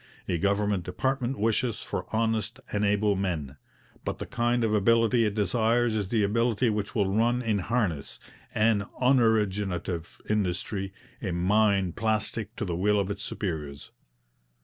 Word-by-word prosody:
A 85 - 0
government 100 -1 +1
department 130 +8 -1
wishes 115 +2 0
for - - -4
honest 110 +1 0
and 105 0 0
able 105 0 +2
men; 80 -8 -3 0.5
but - - -3
the - - -5
kind 120 0 0
of 110 -1 +1
ability 115 +2 +4
it 105 - -3
desires 115 +2 +2
is 105 -3 -1
the 110 -2 +2
ability 115 +3 +2
which 105 +2 -3
will 100 -3 +1
run 120 +3 +2
in 110 -3 +1
harness, 95 - -1 0.4
an 110 -2 +2
unoriginative 105 -9 +1
industry, 95 -1 -1 0.3
a 100 - -2
mind 95 0 +2
plastic 110 0 -1
to 105 - -3
the 85 -3 -2
will 105 +4 +2
of 100 0 -1
its 100 0 -5
superiors. 75 -9 -4
105 Hz, 150 wpm, -27 LUFS, 95-115 Hz, 0.5 s, ability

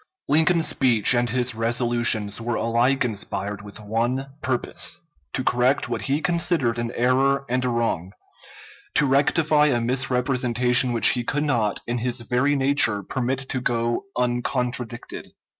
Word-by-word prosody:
Lincoln's 160 +2 +3
speech 120 -4 +3
and 120 0 +1
his 125 +1 0
resolutions 115 -2 0
were 120 0 -2
alike 120 +4 +1
inspired 100 -2 -4
with 100 0 -10
one 120 +6 -2
purpose: 130 -2 -1 0.3
to 130 - -2
correct 125 +3 +1
what - - -3
he 140 +3 -1
considered 170 -9 0
an 120 0 -3
error 135 +3 +1
and 125 +1 -1
a 125 - 0
wrong; 115 -7 -2 0.8
to 150 - +4
rectify 150 +2 +3
a 125 -5 +1
misrepresentation 125 0 +1
which 115 -1 +5
he 120 - +1
could 145 +5 -1
not, 120 -8 0
in 120 +1 -2
his 120 +1 -2
very 125 +5 +1
nature, 135 -7 +2
permit 130 +4 -3
to 130 - -2
go 120 +4 -1
uncontradicted. 125 -1 -3
125 Hz, 140 wpm, -23 LUFS, 115-135 Hz, 0.8 s, which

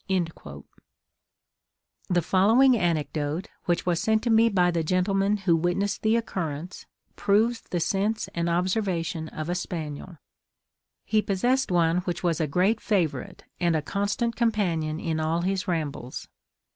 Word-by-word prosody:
The 175 -2 +2
following 225 - +5
anecdote, 160 -3 -1 0.2
which 175 -1 0
was 175 -2 +1
sent 220 0 +1
to 235 - +1
me 225 +1 +5
by 180 -4 +3
the 170 -1 0
gentleman 195 +4 +1
who 185 -4 +2
witnessed 175 +5 0
the 220 +1 +3
occurrence, 180 -6 -4 0.3
proves 225 +4 +2
the 175 - -3
sense 205 +6 0
and 170 0 -1
observation 175 -3 -1
of 155 0 -6
a 175 - -1
spaniel. 165 -1 -5 0.9
He 215 0 +2
possessed 245 +7 +1
one 170 -1 +3
which 175 -1 -3
was 170 -2 +1
a 155 - +1
great 190 +9 +1
favourite, 165 - -1 0.2
and 170 -2 +2
a 155 - 0
constant 205 +6 -1
companion 175 -9 0
in 160 -2 -2
all 160 +2 0
his 190 +1 -1
rambles. 145 -7 -3
180 Hz, 140 wpm, -26 LUFS, 165-205 Hz, 0.9 s, following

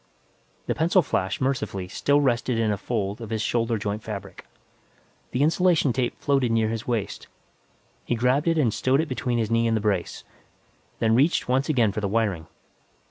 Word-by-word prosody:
The - - 0
pencil 170 +3 +3
flash, 95 -7 -1
mercifully, 110 -8 -2
still 145 +9 +1
rested 125 -2 +1
in 110 -2 +1
a 105 - -1
fold 105 -2 -3
of 115 - -7
his 110 -1 -2
shoulder 115 0 0
joint 105 +1 -3
fabric. 100 -3 -8 0.8
The 125 +3 0
insulation 165 -4 +3
tape 125 -1 -2
floated 135 -4 +1
near 110 -1 +2
his 115 0 -4
waist; 110 -5 -3 0.8
he - - -1
grabbed 125 +6 +1
it 165 -1 +2
and 125 -8 +2
stowed 130 +2 +1
it 160 - -3
between 125 -2 -2
his 115 -1 -1
knee 115 0 +2
and 115 -1 +1
the - - -2
brace, 100 -5 -1 0.7
then 110 -1 +2
reached 140 +8 +2
once 130 +4 +1
again 120 -8 +3
for 105 - -4
the 100 - 0
wiring. 100 -6 -1
115 Hz, 185 wpm, -25 LUFS, 105-135 Hz, 0.8 s, pencil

